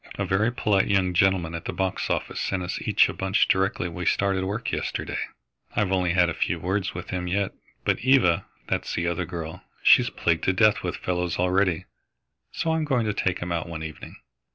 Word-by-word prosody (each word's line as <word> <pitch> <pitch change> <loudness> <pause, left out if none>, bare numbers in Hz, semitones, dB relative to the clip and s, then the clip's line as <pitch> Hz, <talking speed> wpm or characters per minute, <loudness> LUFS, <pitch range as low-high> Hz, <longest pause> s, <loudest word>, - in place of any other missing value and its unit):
"A - - -2
very 105 +5 +2
polite 105 -5 +1
young 95 -2 +2
gentleman 90 -2 +2
at 85 0 -6
the - - -2
box 95 -1 -2
office - - -2
sent 95 -2 -1
us 90 - -4
each - - +4
a - - -4
bunch 95 +2 +1
directly 95 -2 +1
we 90 +1 -5
started 95 -1 +1
work 105 +4 -3
yesterday. - - -3 0.6
I've 100 -3 +1
only 90 -2 +1
had 90 -1 +4
a 85 - -1
few - - -1
words 95 0 -2
with 90 - -6
him 90 -1 -2
yet, 95 +2 0 0.3
but - - +2
Eva 125 -10 +3 0.2
that's - - -2
the 85 - -1
other 85 +1 -1
girl 80 -2 -6 0.2
she's - - +6
plagued 80 -1 0
to 95 - +3
death 105 +3 +4
with - - -3
fellows 90 -1 -2
already, 90 -1 +1 0.7
so 160 - -1
I'm 160 -1 0
going 130 -6 +1
to 105 - 0
take 95 -3 -1
him 90 - -5
out 85 -1 -2
one 80 -1 -5
evening." 80 -1 -8
95 Hz, 205 wpm, -25 LUFS, 85-100 Hz, 0.7 s, she's